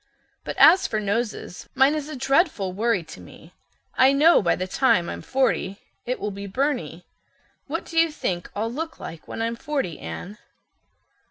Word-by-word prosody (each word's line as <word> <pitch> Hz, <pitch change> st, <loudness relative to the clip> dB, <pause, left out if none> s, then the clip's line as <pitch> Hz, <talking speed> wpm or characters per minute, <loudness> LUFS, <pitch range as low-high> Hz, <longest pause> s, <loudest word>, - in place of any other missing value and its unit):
But -, -, -6 dB
as 360 Hz, +4 st, +7 dB
for 215 Hz, -, -1 dB
noses, 210 Hz, -2 st, -3 dB
mine 270 Hz, +2 st, +5 dB
is 305 Hz, -1 st, -4 dB
a 305 Hz, -, -6 dB
dreadful 270 Hz, -, +1 dB
worry 215 Hz, -2 st, 0 dB
to 160 Hz, -, -12 dB
me. 90 Hz, -, -15 dB, 0.4 s
I 265 Hz, +1 st, +5 dB
know 310 Hz, +5 st, +5 dB
by 175 Hz, -, +2 dB
the 185 Hz, -, -3 dB
time 220 Hz, -3 st, +2 dB
I'm -, -, -5 dB
forty 255 Hz, -7 st, 0 dB, 0.3 s
it 250 Hz, -, -2 dB
will 210 Hz, -, -3 dB
be 200 Hz, 0 st, -7 dB
Byrney. 195 Hz, -, -2 dB, 0.6 s
What 330 Hz, +4 st, -4 dB
do 330 Hz, -, 0 dB
you 330 Hz, 0 st, +4 dB
think 175 Hz, -, -3 dB
I'll 220 Hz, +3 st, -2 dB
look 320 Hz, +4 st, -5 dB
like 165 Hz, -1 st, -9 dB
when 225 Hz, -, -4 dB
I'm 230 Hz, +1 st, -1 dB
forty, 265 Hz, -, -3 dB
Anne?" 175 Hz, -, -8 dB
230 Hz, 175 wpm, -24 LUFS, 190-280 Hz, 0.6 s, as